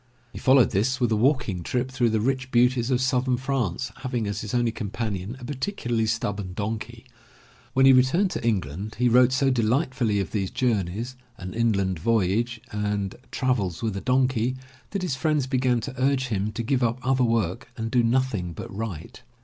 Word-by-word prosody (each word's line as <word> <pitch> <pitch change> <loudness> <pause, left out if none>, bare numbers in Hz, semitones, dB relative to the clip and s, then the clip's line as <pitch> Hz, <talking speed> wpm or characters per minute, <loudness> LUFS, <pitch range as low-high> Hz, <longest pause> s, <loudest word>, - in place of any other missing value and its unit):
He - - -7
followed 130 -4 +5
this 125 +7 +1
with 120 -3 +1
a - - +3
walking 120 - +1
trip 125 +8 -2
through 125 -2 +2
the 110 0 +1
rich 130 +3 -1
beauties 125 0 +3
of 125 -1 +2
Southern 130 -1 +1
France, 125 -4 -2
having 125 -4 -2
as 100 0 -3
his 105 - -5
only 120 -1 +2
companion 110 0 -4
a 125 - -8
particularly 120 - -2
stubborn 105 -4 -2
donkey. 110 +4 -5 0.7
When 135 +1 +4
he 135 - +8
returned 150 +10 +3
to - - -4
England 100 -2 -2
he 125 +1 +3
wrote 125 +1 +5
so 135 +1 +2
delightfully 120 -2 +1
of 95 - -3
these 100 -3 -1
journeys. 115 -1 -1 0.2
An 90 0 -7
Inland 100 -6 +1
Voyage, 115 +4 +1
and 105 -2 -2 0.2
Travels 115 - -1
With 110 -3 -1
A 100 - -3
Donkey, 130 -1 +1 0.3
that 200 -2 -3
his 175 -8 -1
friends 150 0 +1
began 130 -2 +1
to 115 - -5
urge 130 -1 +1
him 105 -1 -1
to 115 - -3
give 130 +2 0
up 120 0 +1
other 130 -1 +2
work 115 -3 0
and 115 0 -3
do 125 -1 +4
nothing 115 -7 0
but 90 - -8
write. 100 -7 -6
120 Hz, 185 wpm, -25 LUFS, 105-130 Hz, 0.7 s, he